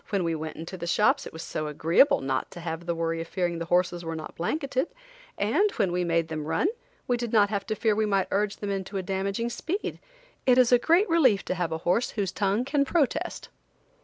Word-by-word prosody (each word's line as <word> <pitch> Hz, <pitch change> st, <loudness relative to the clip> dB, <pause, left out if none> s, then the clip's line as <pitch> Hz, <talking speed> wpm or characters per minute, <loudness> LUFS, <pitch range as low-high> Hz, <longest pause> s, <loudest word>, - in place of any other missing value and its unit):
When 200 Hz, -3 st, 0 dB
we 165 Hz, -1 st, 0 dB
went 160 Hz, 0 st, -5 dB
into 165 Hz, +4 st, -7 dB
the 170 Hz, -1 st, -5 dB
shops 215 Hz, -, +2 dB
it -, -, -9 dB
was 160 Hz, -, -8 dB
so 155 Hz, -, -3 dB
agreeable 165 Hz, -, +3 dB
not 135 Hz, -1 st, -1 dB
to -, -, -10 dB
have 165 Hz, 0 st, -5 dB
the 170 Hz, -, 0 dB
worry 165 Hz, 0 st, -1 dB
of 165 Hz, -, -6 dB
fearing 175 Hz, -2 st, -1 dB
the 170 Hz, -, -3 dB
horses 175 Hz, 0 st, +1 dB
were 165 Hz, 0 st, -4 dB
not 155 Hz, -1 st, -7 dB
blanketed, 275 Hz, -, -1 dB, 0.5 s
and 420 Hz, +1 st, +2 dB
when 195 Hz, -5 st, +1 dB
we 180 Hz, 0 st, 0 dB
made 165 Hz, -1 st, +1 dB
them 155 Hz, -2 st, -4 dB
run 255 Hz, -, +1 dB, 0.4 s
we 245 Hz, -, +2 dB
did 240 Hz, -2 st, -4 dB
not 210 Hz, -3 st, +4 dB
have 200 Hz, -2 st, -2 dB
to 215 Hz, -, -1 dB
fear 220 Hz, 0 st, +2 dB
we 215 Hz, +1 st, +1 dB
might 195 Hz, -2 st, +1 dB
urge 205 Hz, +1 st, +1 dB
them 205 Hz, -1 st, -4 dB
into 195 Hz, 0 st, -3 dB
a 190 Hz, -, -2 dB
damaging 195 Hz, +5 st, -2 dB
speed. 370 Hz, -, -3 dB, 0.5 s
It 250 Hz, -1 st, +6 dB
is 255 Hz, -1 st, +5 dB
a 245 Hz, -, +6 dB
great 340 Hz, -, +3 dB
relief 260 Hz, -12 st, +3 dB
to -, -, -1 dB
have 175 Hz, -2 st, -2 dB
a 160 Hz, -, -1 dB
horse 205 Hz, +8 st, +2 dB
whose 195 Hz, -3 st, 0 dB
tongue 205 Hz, +4 st, 0 dB
can 280 Hz, +1 st, +2 dB
protest. 285 Hz, -1 st, -1 dB
195 Hz, 235 wpm, -27 LUFS, 170-240 Hz, 0.5 s, It